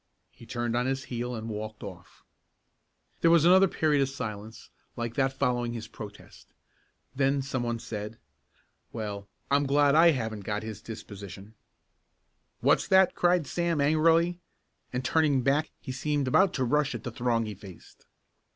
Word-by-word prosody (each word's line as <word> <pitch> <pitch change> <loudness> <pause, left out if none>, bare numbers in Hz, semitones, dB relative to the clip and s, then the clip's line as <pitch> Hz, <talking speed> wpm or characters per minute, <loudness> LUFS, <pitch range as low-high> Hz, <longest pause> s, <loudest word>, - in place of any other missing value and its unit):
He 115 - -16
turned 120 -1 -2
on 125 +1 +1
his 135 0 -1
heel 120 +1 -3
and 110 0 -6
walked 110 0 -6
off. 95 -4 -11 1.0
There 165 - +4
was 165 -1 +5
another 190 +2 +7
period 150 -5 +1
of 135 - +1
silence 110 -3 -7 0.2
like 120 -1 -4
that 135 0 +1
following 125 -3 -1
his 115 -2 -6
protest. 105 -2 -11 0.7
Then 135 0 +1
some 130 -2 -3
one 120 -1 -1
said: 105 -1 -6 0.7
"Well, 105 -3 -5 0.2
I'm 140 0 +3
glad 145 0 +4
I 165 +2 +7
haven't 115 -8 -1
got 105 +1 -3
his 110 -3 -7
disposition." 100 -2 -9 1.1
"What's - - +3
that?" 190 -1 +5
cried 175 -2 +2
Sam 170 +1 -1
angrily, 165 +4 +3 0.5
and 125 0 -3
turning 145 -2 +2
back 145 +4 +2
he - - -7
seemed 145 +1 -1
about 185 +8 +4
to 130 - 0
rush 145 +2 +1
at 115 - -7
the 125 - -5
throng 115 0 0
he 105 - -5
faced. 95 -2 -14
125 Hz, 160 wpm, -28 LUFS, 110-145 Hz, 1.1 s, another